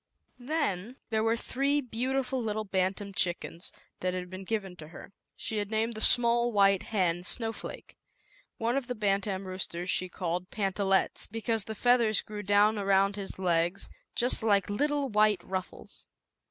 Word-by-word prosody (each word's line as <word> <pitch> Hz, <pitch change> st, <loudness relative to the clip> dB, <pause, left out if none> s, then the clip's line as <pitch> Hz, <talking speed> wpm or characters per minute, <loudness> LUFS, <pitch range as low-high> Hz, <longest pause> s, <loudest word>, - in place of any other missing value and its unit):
Then 245 Hz, -, -2 dB, 0.2 s
there 220 Hz, -1 st, +1 dB
were 225 Hz, +1 st, +2 dB
three 275 Hz, +5 st, 0 dB
beautiful 260 Hz, +1 st, -2 dB
little 215 Hz, -1 st, -2 dB
bantam 195 Hz, 0 st, -2 dB
chickens, 175 Hz, -2 st, -2 dB, 0.3 s
that 185 Hz, 0 st, -1 dB
had 180 Hz, 0 st, -5 dB
been 190 Hz, +1 st, -7 dB
given 195 Hz, -4 st, -3 dB
to 155 Hz, -, -10 dB
her. 165 Hz, -, -12 dB, 0.2 s
She 220 Hz, -, -4 dB
had 205 Hz, -1 st, -2 dB
named 225 Hz, +2 st, 0 dB
the 215 Hz, -, -5 dB
small 240 Hz, 0 st, +5 dB
white 195 Hz, -3 st, +4 dB
hen 180 Hz, -5 st, 0 dB
Snowflake. 225 Hz, +4 st, -3 dB, 0.6 s
One 230 Hz, +2 st, 0 dB
of 275 Hz, -3 st, -1 dB
the 250 Hz, -, -3 dB
bantam 195 Hz, -2 st, -1 dB
roosters 185 Hz, -1 st, -2 dB
she 185 Hz, -, +1 dB
called 180 Hz, 0 st, -3 dB
Pantallettes, 195 Hz, -1 st, 0 dB
because 225 Hz, -1 st, -1 dB
the 220 Hz, -, -6 dB
feathers 235 Hz, -2 st, +3 dB
grew 210 Hz, -1 st, -7 dB
down 205 Hz, +2 st, +3 dB
around 195 Hz, 0 st, +2 dB
his 200 Hz, -2 st, -6 dB
legs 175 Hz, 0 st, 0 dB, 0.3 s
just 245 Hz, +1 st, +3 dB
like 205 Hz, -2 st, +2 dB
little 290 Hz, +5 st, 0 dB
white 210 Hz, -3 st, +2 dB
ruffles. 185 Hz, -1 st, -7 dB
205 Hz, 155 wpm, -29 LUFS, 190-230 Hz, 0.6 s, small